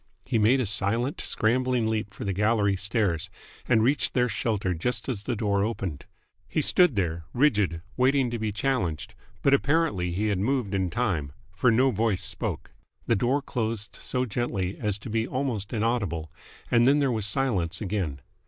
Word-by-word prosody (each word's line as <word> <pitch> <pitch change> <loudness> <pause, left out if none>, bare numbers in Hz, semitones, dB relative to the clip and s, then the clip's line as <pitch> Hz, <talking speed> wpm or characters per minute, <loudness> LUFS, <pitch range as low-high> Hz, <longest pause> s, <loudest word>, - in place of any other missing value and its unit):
He 120 -3 +1
made 115 +6 +4
a 130 - +1
silent, 110 - 0
scrambling 125 +1 +1
leap 110 -2 -1
for 100 - -7
the 100 - -1
gallery 105 0 +2
stairs, 95 -4 0 0.4
and 115 -3 +4
reached 135 +4 +1
their 125 -1 +3
shelter 105 -5 -1
just 110 +7 -2
as 120 -7 -3
the 120 +4 -2
door 100 -2 +1
opened. 95 -9 -3 0.4
He - - -1
stood 180 -5 +4
there, 85 -4 -1
rigid, 105 - +2
waiting 130 -1 +3
to 120 - -3
be 110 -1 -1
challenged, 105 - -2 0.3
but 140 - +4
apparently 140 - +2
he 105 +5 0
had 100 -3 0
moved 120 -1 0
in 95 -2 0
time, 85 - -1 0.2
for 125 - +2
no 130 +4 +4
voice 110 -3 0
spoke. - - -3 0.3
The 115 - +2
door 130 +7 +1
closed 110 -3 -3
so 125 0 -2
gently 100 -5 -2
as 105 -3 -1
to 110 +3 -9
be 110 +1 0
almost 125 -6 -2
inaudible, 100 -9 -1 0.4
and 120 0 +5
then 140 +2 +5
there 140 -3 +2
was 110 -3 0
silence 105 -9 0
again. 95 -9 -3
110 Hz, 175 wpm, -26 LUFS, 100-125 Hz, 0.4 s, and